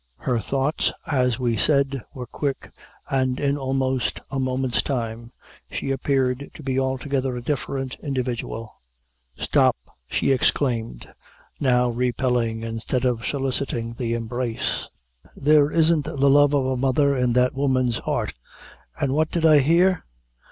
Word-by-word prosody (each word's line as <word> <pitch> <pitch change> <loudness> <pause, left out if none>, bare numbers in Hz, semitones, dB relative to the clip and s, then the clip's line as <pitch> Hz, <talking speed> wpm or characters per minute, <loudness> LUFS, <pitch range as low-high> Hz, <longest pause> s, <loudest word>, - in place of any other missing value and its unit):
Her 125 -3 -1
thoughts, 135 +6 0
as 125 -5 +1
we 120 -3 0
said, 140 0 +2
were 125 -2 -5
quick, 140 +2 -4 0.4
and 130 -1 +1
in 140 0 +1
almost 130 -2 -1
a 135 - -2
moment's 130 -1 0
time 115 -3 -4 0.4
she 135 - -3
appeared 135 0 0
to - - -10
be 130 -1 0
altogether 130 -1 -1
a - - -5
different 135 -1 -3
individual. 125 -5 -3 0.6
"Stop!" - - +3 0.3
she - - +1
exclaimed, 120 - 0 0.5
now 125 -3 +3
repelling 120 -2 0
instead 115 +3 -2
of 120 -3 0
soliciting 130 -4 -1
the 115 -1 -2
embrace 115 0 -2 0.5
"there 150 0 +4
isn't 160 -1 +3
the 140 -3 +1
love 145 0 +5
of 135 -2 +2
a 130 0 0
mother 135 +2 +2
in 125 -2 +1
that 125 +1 +3
woman's 130 -3 +1
heart - - -2 0.7
an' 135 -2 0
what 155 +2 +1
did 170 -2 0
I 155 -2 +7
hear? 170 +6 +3
130 Hz, 135 wpm, -23 LUFS, 125-140 Hz, 0.7 s, I